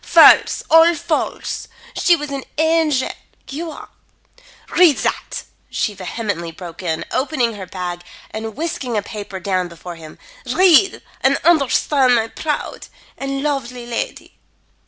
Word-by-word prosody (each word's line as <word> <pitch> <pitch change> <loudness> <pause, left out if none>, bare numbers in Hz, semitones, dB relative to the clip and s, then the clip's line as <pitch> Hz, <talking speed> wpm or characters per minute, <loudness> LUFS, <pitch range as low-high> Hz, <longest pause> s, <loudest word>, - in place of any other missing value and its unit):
false! - - +6
all 325 +1 +6
false! 335 -1 -2 0.3
She 350 - +4
was 295 -3 -6
an 275 -1 -4
angel. 315 -4 +2 0.4
You 325 +4 -4
are - - -10 0.9
read 340 -6 +6
that!" - - -2 0.3
she 210 - -1
vehemently 195 -2 -4
broke 170 0 -9
in, 160 -3 -2
opening 255 -4 0
her 195 -3 -8
bag 175 -1 -5 0.3
and 220 0 -5
whisking 285 -7 -3
a 205 - 0
paper 205 -3 -7
down 185 -2 -1
before 170 0 -9
him. 160 -1 -12 0.3
"Read 370 +1 +5 0.2
and - - +3
understand 275 -4 +4
my 225 -1 +1
proud 300 +4 -4 0.3
and 275 0 -3
lovely 250 -4 -2
lady. 235 -1 -5
250 Hz, 135 wpm, -19 LUFS, 195-310 Hz, 0.9 s, false